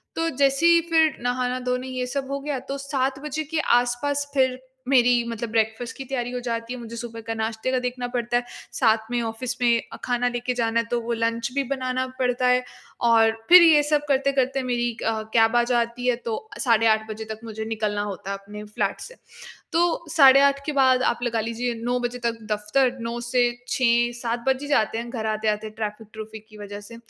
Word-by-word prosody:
तो 330 0 0
जैसे 275 +1 +2
ही 340 0 +6
फिर 320 -3 +4
नहाना-धोना 250 +1 -1
ये 255 -1 -3
सब 270 +1 -3
हो 280 - -2
गया 280 -1 -3
तो 275 - -2
7 270 -1 -2
बजे 310 +1 -3
के 320 - +2 0.2
आस-पास 285 +4 -2
फिर 260 -2 +2 0.3
मेरी 245 -2 +4
मतलब 230 0 -4
ब्रेकफास्ट 225 +1 -1
की 270 - -5
तैयारी 245 -2 -3
हो 250 - -3
जाती 230 +1 -3
है। 250 - -7
मुझे 235 -1 -8
सुबह 230 -1 -7
का 225 0 -4
नाश्ते 220 +2 -2
का 260 - +1
देखना 250 0 -3
पड़ता 240 0 0
है। 245 - -1 0.3
साथ 220 -1 +1
में 240 - 0
ऑफिस 240 +2 -4
में 235 -1 +4
अ, - - -7
खाना 245 0 +1
लेके 245 +1 -2
जाना 230 -1 0
है 230 - -1
तो 240 - +1
वो 235 +1 -3
लंच 230 +1 -1
भी 280 - +1
बनाना 255 -1 -2
पड़ता 250 0 +1
है। 250 0 +3 0.4
और 225 -1 +5 0.2
फिर 360 0 +10
ये 315 -3 +7
सब 295 0 +1
करते-करते 270 -1 +1
मेरी 240 -1 0
क 220 -1 -2
कैब 225 0 +4
आ 240 - +5
जाती 240 0 -1
है 250 - +3
तो 235 - -4
साढ़े 230 -3 +3
8 220 0 +2
बजे 220 +1 -6
तक 220 0 -7
मुझे 220 -1 -6
निकलना 215 -2 -2
होता 200 -1 -5
है 200 - -3
अपने 205 +1 -10
फ्लैट 210 0 -2
से। - - -10 0.6
तो 340 0 +1
साढ़े 275 -3 +7
8 280 0 +3
के 305 - -1
बाद 260 -2 +4
आप 235 - +1
लगा 235 -2 0
लीजिए 230 +2 -2
9 245 +1 0
बजे 245 0 -3
तक 230 -1 -1
दफ्तर, 210 +5 +1
9 230 +1 -4
से 240 0 +2 0.2
6-7 240 -1 +1
बज 265 +1 +1
ही 290 - -6
जाते 225 -5 +1
हैं 235 +1 -5
घर 225 -3 -4
आते-आते 215 0 -1
ट्रैफिक-ट्रुफिक 215 0 -7
की 215 -1 -15
वजह 205 0 -7
से। 230 +3 -12
240 Hz, 210 wpm, -24 LUFS, 225-260 Hz, 0.6 s, फिर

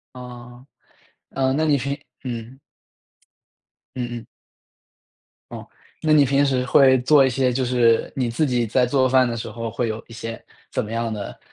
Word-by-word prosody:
呃。 125 0 -11 0.6
嗯， 130 -1 0
那 155 - +1
你 150 -2 +3
平 140 +2 -3 0.3
嗯。 120 +1 -6 1.4
嗯 125 -1 -3
嗯。 - - -16 1.3
哦， - - -8 0.3
那 155 -1 +1
你 145 -2 +6
平 140 +2 +2
时 130 -2 0
会 130 0 +5
做 140 +1 +5
一 - - +3
些 130 0 +1
就 130 +1 -1
是 120 -2 +2
你 125 -3 0
自 145 +6 0
己 125 -2 0
在 125 +3 +2
做 130 0 +2
饭 130 -1 +4
的 115 - -3
时 115 - -6
候 115 -1 -5
会 115 +1 -2
有 110 0 -4
一 115 - -15
些 115 0 -7 0.3
怎 - - -2
么 105 - -9
样 115 0 -2
的 105 -2 -6
125 Hz, 185 characters per minute, -22 LUFS, 115-135 Hz, 1.4 s, 你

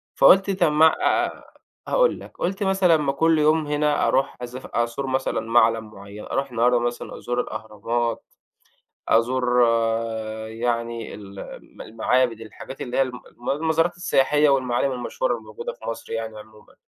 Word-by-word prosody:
فقُلت 195 +1 +6
طَب 155 - +4
ما 155 +2 +5
اع - - +2
آآ - - -9 0.4
هاقول - - +2
لك، - - -13
قُلت 195 +3 -2
مثلًا 190 -4 +3
ما 145 -3 0
كل 160 +3 +2
يوم 155 0 +3
هنا 150 0 +1
أرُوح 135 +1 +1
أزف 125 +1 -7
أزور 120 +3 -2
مثلًا 130 0 -1
مَعلَم 115 -1 +2
معيّن 100 +2 -10
أرُوح 140 -1 -2
النهارده 120 +1 +3
مثلًا 120 0 -4
أزور 120 0 -2
الأهرامات، 110 +2 -3 0.8
أزور 125 +2 +2 0.9
يعني 115 0 -3
ال 100 -1 -11 0.4
م - - -8
المعابد، 115 +1 0
الحاجات 115 +4 -10
اللي 125 - -4
هي - - +4
الم 125 -2 -3
الم 120 - -8
المزارات 160 +3 +1
السياحية 150 -3 +3
والمعالِم 130 0 +1
المشهورة 130 - -2
اللي - - -6
موجودة 480 +1 -6
في - - -14
مصر 290 - -6
يعني 110 -1 -4
عمومًا، 105 0 -17
125 Hz, 155 wpm, -23 LUFS, 115-150 Hz, 0.9 s, فقُلت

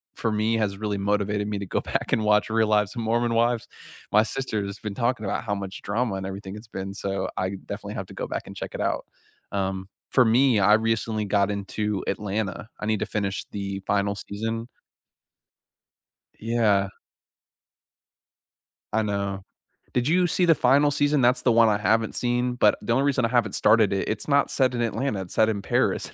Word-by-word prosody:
for 115 - -1
me 110 +2 +1
has 105 -3 0
really 105 -1 -2
motivated 105 +1 0
me 105 -1 -2
to 100 - -4
go - - -1
back - - -2
and 110 - +2
watch 105 0 +3
Real 110 0 +2
Lives 105 +1 +2
of 120 - -3
Mormon 115 +1 +1
Wives. 115 0 +1 0.5
My 105 +1 +6
sister 110 -3 -2
has 100 0 -7
been 105 -2 -5
talking 120 -1 0
about 95 - -2
how 105 -3 -2
much 100 -1 -6
drama 110 +1 -1
and 95 0 -4
everything 95 0 -6
it's 105 +1 -11
been, 95 -1 -5
so 95 -1 -3
I 95 - -1 0.2
definitely - - -6
have - - -4
to - - -12
go - - -4
back - - -4
and - - -9
check - - -6
it - - -5
out. - - -1 0.5
Um, 95 -1 -2 0.2
for 125 - +5
me, 120 +1 +4
I 105 +2 +6
recently 110 -1 0
got 100 0 +2
into 100 0 -2
Atlanta, 105 +1 -3
I - - -4
need 110 -1 0
to - - +1
finish 100 -2 -2
the 100 -1 -4
final 100 0 +1
season. 115 +3 -4 1.7
Yeah. 105 -4 +2 2.0
I 110 - +3
know. 100 -2 -2 0.5
Did 125 +2 +1
you 180 +3 +4
see 180 +2 +1
the 165 -2 +6
final 140 +4 +4
season? 145 0 +2
That's 125 +1 +3
the 125 - +3
one 115 0 +6
I 105 -1 +2
haven't 110 +1 +1
seen, 125 0 0
but, 105 -4 +4
the 110 - 0
only 135 +4 +2
reason 135 -3 +2
I - - +3
haven't 115 -4 +1
started 110 -3 +4
it, 95 - -1
it's 110 - -2
not 140 -1 +3
set 130 -2 +2
in 120 - -1
Atlanta, 120 -1 -1
it's 90 - -9
set 110 - +4
in 105 -3 -1
Paris, - - 0
110 Hz, 200 wpm, -25 LUFS, 100-120 Hz, 2.0 s, My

